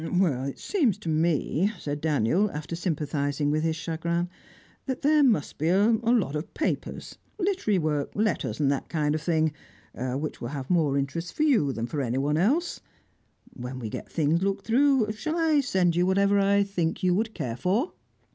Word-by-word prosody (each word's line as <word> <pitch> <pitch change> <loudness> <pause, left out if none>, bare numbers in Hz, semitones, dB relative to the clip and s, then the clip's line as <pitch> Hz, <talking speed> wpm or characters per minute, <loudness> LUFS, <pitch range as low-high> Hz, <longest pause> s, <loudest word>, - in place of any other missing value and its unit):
"It 150 -7 0
seems 270 - +1
to 190 -6 -6
me," 160 +4 +1
said 145 -3 -4
Daniel, 160 - +2
after 150 0 -5
sympathising 145 -4 -1
with 155 +1 +1
his 160 0 0
chagrin, 170 +2 -2 0.6
"that 260 -1 -3
there 300 +1 +5
must 220 - +1
be 155 +3 +1
a 200 +5 +4
lot 230 - +2
of 150 +2 -4
papers, - - -3 0.2
literary 365 - +1
work, 150 -4 -1
letters, 215 -5 -1
and 140 -2 +3
that 140 - -3
kind 150 -2 0
of 155 - -2
thing, 160 -2 +1 0.4
which 130 +6 -4
will 120 - -3
have 140 +1 -5
more 155 -6 +2
interest 165 +5 -3
for 305 - +1
you 230 - +3
than 115 -2 -3
for 145 +4 -3
anyone 135 +4 0
else. 280 - +1 0.7
When 125 +1 -6
we 115 -4 -5
get - - -7
things 160 +1 +1
looked 195 0 -1
through, 255 -2 +3
shall 310 +10 -3
I 320 -3 +3
send 185 -10 +1
you 175 +1 +2
whatever 200 +1 +3
I 200 0 +3
think 180 -5 -2
you 180 -1 +3
would 220 +3 -1
care 115 -2 -3
for?" 195 - 0
170 Hz, 180 wpm, -26 LUFS, 145-210 Hz, 0.7 s, there